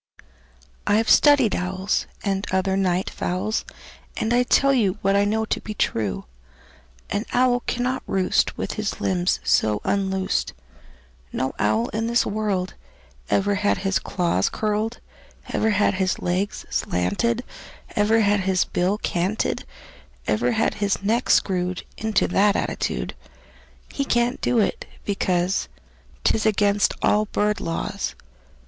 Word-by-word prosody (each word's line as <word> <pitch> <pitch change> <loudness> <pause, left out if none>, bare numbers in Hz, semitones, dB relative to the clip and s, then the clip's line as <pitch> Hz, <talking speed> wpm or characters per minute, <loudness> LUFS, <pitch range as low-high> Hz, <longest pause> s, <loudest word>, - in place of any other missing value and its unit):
"I've 220 +2 +3
studied 280 -8 +5
owls, 185 +3 -1 0.2
And 195 0 -1
other 190 0 +1
night 185 -1 +1
fowls, 190 +5 -2 0.5
And 220 +2 0
I 245 - +4
tell 275 +2 +3
you 210 -6 +2
What 195 0 +3
I 200 0 +3
know 220 +2 0
to - - -2
be 215 - -6
true: 105 - -1 0.9
An 205 - 0
owl 245 0 +3
cannot 250 +1 -1
roost 190 -1 +1
With - - -3
his 210 -1 -3
limbs 180 -1 +1
so 105 -1 +2
unloosed; 190 -1 0 0.8
No 130 - -2
owl 110 +2 +2
in 225 +1 -2
this 235 0 +2
world 200 -3 -1 0.6
Ever 205 +1 +2
had 205 +1 +1
his 195 0 +2
claws 170 - 0
curled, 215 +2 -2 0.5
Ever 220 - +1
had 205 -1 +2
his 185 -1 0
legs 185 +3 -2
slanted, 230 - 0 0.5
Ever 215 +2 +3
had 205 -1 +3
his 190 -1 +1
bill 185 +4 0
canted, 185 +2 -1 0.6
Ever 120 +3 +1
had 220 - +1
his 200 -1 -1
neck 230 +5 0
screwed 185 -1 +1
Into 220 -2 +1
that 205 +1 +3
attitude. - - -2 0.8
He 280 - -1
can't 240 -1 0
do 245 - +1
it, 215 - 0 0.2
because 185 -2 0 0.6
'T - - +4
is 220 0 +1
against 205 -1 +2
all 210 +1 +3
bird 210 0 0
laws. 165 - -3
200 Hz, 135 wpm, -23 LUFS, 185-220 Hz, 0.9 s, studied